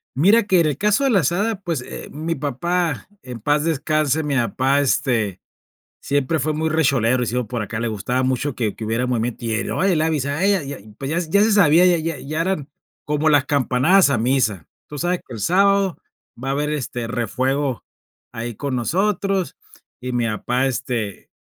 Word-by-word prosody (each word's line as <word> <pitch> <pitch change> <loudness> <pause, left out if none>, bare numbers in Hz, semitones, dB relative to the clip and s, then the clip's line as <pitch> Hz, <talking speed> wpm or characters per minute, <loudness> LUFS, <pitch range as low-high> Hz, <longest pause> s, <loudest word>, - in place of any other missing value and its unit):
Mira 200 - +5
que 190 -3 +3
en - - +2
el 145 -3 -1
caso 210 +6 +2
de 270 - +3
la 200 - +4
asada 190 - 0
pues, 165 -8 -2
eh, - - -8
mi 160 +3 -3
papá, 160 +3 -2
en 125 -2 -8
paz 145 +5 +1
descanse, 155 -1 0
mi 145 -2 -1
apá, 130 +3 +1
este, 115 -8 0 0.6
siempre 145 +3 0
fue 155 +3 0
muy 160 +1 0
recholero 135 -6 +2
y - - -1
decimos 120 +1 -1
por 120 -3 -3
acá, 115 +2 -4
le 120 - -1
gustaba 120 +4 -1
mucho 130 +2 -1
que 110 -4 -2
que 110 - -6
hubiera 115 +3 -1
movimiento 120 0 -2
y 115 - -1
él, 110 - -2
"oye, 185 -2 +1
le 155 - +1
avisé 150 -4 0
a 150 +6 -1
ella", 195 -4 +3
ya, 140 0 -6 0.2
pues 135 0 -4
ya 165 - 0
ya 180 +4 +2
se 220 0 +3
sabía, 175 -3 +5
ya 180 -2 +4
ya 160 -2 -3
ya 155 +3 -4
eran 165 -5 -1 0.4
como 150 +1 +1
las 145 -3 +4
campanadas 145 +6 +3
a 130 - +1
misa. 110 - 0 0.2
Tú 150 - -7
sabes 175 +3 0
que 125 - -9
el 110 - -7
sábado 195 - +2 0.4
va 135 - -3
a - - +1
haber, 150 +1 -1
este, 125 -5 -3
refuego 130 +3 -1 0.5
ahí 120 0 -5
con 135 +3 -3
nosotros 190 - 0 0.4
y 125 0 -5
mi 120 -1 0
apá, 125 +4 -1
este 120 -6 -3
145 Hz, 200 wpm, -21 LUFS, 125-165 Hz, 0.6 s, Mira